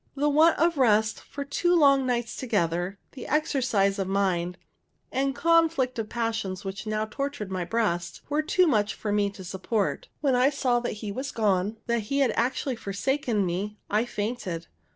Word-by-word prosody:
The 290 +1 +2
want 315 +3 +5
of 335 -2 +2
rest 220 -3 +3
for 280 0 -7
two 350 +5 +1
long 275 -5 +5
nights 240 -2 -1
together, 185 -5 -1
the 260 - -9
exercise 240 -10 +1
of 190 - -1
mind, 185 -2 0 0.5
and 270 +1 0
conflict 330 -7 +2
of 215 -1 -3
passions 225 -5 -2
which 195 +3 -5
now 215 0 0
tortured 245 -3 -4
my 185 -2 -2
breast, 175 -4 -1
were 295 +1 +1
too 360 +4 +3
much 215 -10 +1
for 210 - -3
me 205 -1 +2
to 195 -1 -11
support. 190 +3 -2
When 280 -3 +2
I 250 +2 +4
saw 255 -4 +1
that 240 - -3
he 205 - -3
was 260 +6 -4
gone, 205 -1 +1
that 235 -1 +1
he 275 - 0
had 270 -4 +3
actually 255 +1 0
forsaken 220 +1 -1
me, 195 +4 -3
I 215 +3 +2
fainted. 205 -7 -4
225 Hz, 175 wpm, -27 LUFS, 200-275 Hz, 0.5 s, want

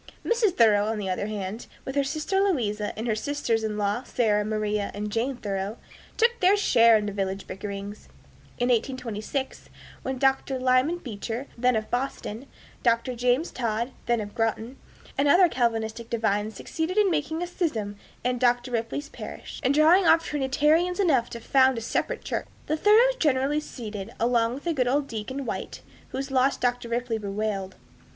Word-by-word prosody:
Mrs. 455 -5 +2
Thoreau, 210 -3 +5
on 220 0 -1
the 195 -3 -2
other 200 +2 -2
hand, 210 +1 -5 0.2
with 265 - -4
her 280 0 +2
sister 310 +7 -1
Louisa 220 - 0
and 220 - -3
her 230 - +1
sisters 230 -1 -1
in 215 -1 -2
law, 205 +3 0
Sarah, 215 -5 +1
Maria, 210 -1 -1
and 210 +1 -4
Jane 240 +4 -1
Thoreau, 200 0 -3 0.4
took 470 +1 +5
their 380 +3 +5
share 230 - +5
in 210 - -2
the 205 - -2
village 195 -1 -3
bickerings. 200 +1 -7 0.5
In 245 +1 0
1826, 250 +1 -2 0.3
when 265 0 -3
Dr. 270 0 +1
Lyman 255 +6 +2
Beecher, 235 -2 -5
then 250 +1 +2
of 215 0 -3
Boston, 250 -1 -3 0.3
Dr. 235 +1 +2
John 250 +4 +2
Todd, 235 -5 -2 0.2
then 240 -1 +2
of 205 -1 -7
Groton, 225 +2 -2 0.4
and 285 - +3
other 355 +5 +6
Calvinistic 230 -3 -1
divines 215 -2 0
succeeded 335 +4 -3
in 410 -3 +4
making 320 +2 -1
a - - -1
schism 240 - -2 0.3
in 250 0 0
Dr. 245 0 +2
Ripley's 235 +5 -3
parish, - - -8
and 265 -2 +2
drawing 325 +5 +5
off 330 0 +5
Trinitarians 300 +6 +1
enough 290 -11 +3
to 235 - -7
found 260 +1 +3
a - - -3
separate 485 - -2
church, - - -3 0.2
the 310 - 0
Thoreaus 455 +8 +5
generally 285 - +2
seceded, 215 -8 -7
along 235 0 +2
with 325 +4 -3
good 255 -3 +1
old 280 +3 +1
Deacon 260 +5 -5
White, - - -5 0.3
whose 270 +1 -4
loss 265 +1 +3
Dr. 245 -1 -1
Ripley 235 -1 -1
bewailed. 200 -2 -3
245 Hz, 170 wpm, -26 LUFS, 215-285 Hz, 0.5 s, other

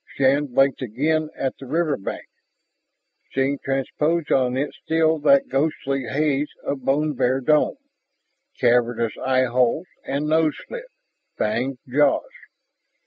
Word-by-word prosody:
Shann 140 +2 +3
blinked 135 +2 +2
again 150 +7 0
at 135 -1 -3
the 135 - -9
riverbank, 155 - -2 1.1
seeing 135 +1 +1
transposed 150 +4 -1
on 130 -1 +2
it 145 +2 -2
still 160 0 +1
that 140 -2 +4
ghostly 135 -1 -1
haze 145 +1 0
of 135 -2 -3
bone 150 +3 +1
bare 130 0 +1
dome, 150 - +2 0.8
cavernous 120 -2 +2
eyeholes 130 +3 +2 0.2
and 140 +2 -2
nose 155 -1 +2
slit, - - -7 0.5
fanged 120 +5 -1
jaws. 145 - +2
135 Hz, 115 wpm, -23 LUFS, 130-150 Hz, 1.1 s, that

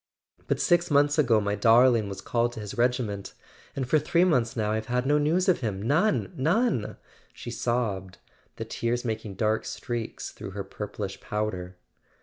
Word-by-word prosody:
"But - - 0
six 175 -2 +3
months 145 +1 +3
ago 120 -7 +4
my 100 -1 -1
darling 115 +1 +4
was 95 -1 -6
called 120 +3 0
to 115 - -7
his 105 -2 -6
regiment—and 120 +1 -3
for 155 +4 +4
three 170 +4 +2
months 125 -9 +2
now 105 -2 0
I've 110 0 -2
had 125 +1 0
no 145 +2 +3
news 170 +6 +1
of 185 - +3
him, 105 -6 -3
none, 130 - +1
none! 165 - +1 0.2
" - - -31
she - - -8
sobbed, 100 -6 -2 0.4
the - - -5
tears 120 +1 -2
making 110 -3 -4
dark 110 +2 +1
streaks 120 -2 -5
through 105 -2 -8
her 100 - -2
purplish 100 0 -6
powder. 95 -4 -3
115 Hz, 170 wpm, -27 LUFS, 105-140 Hz, 0.4 s, ago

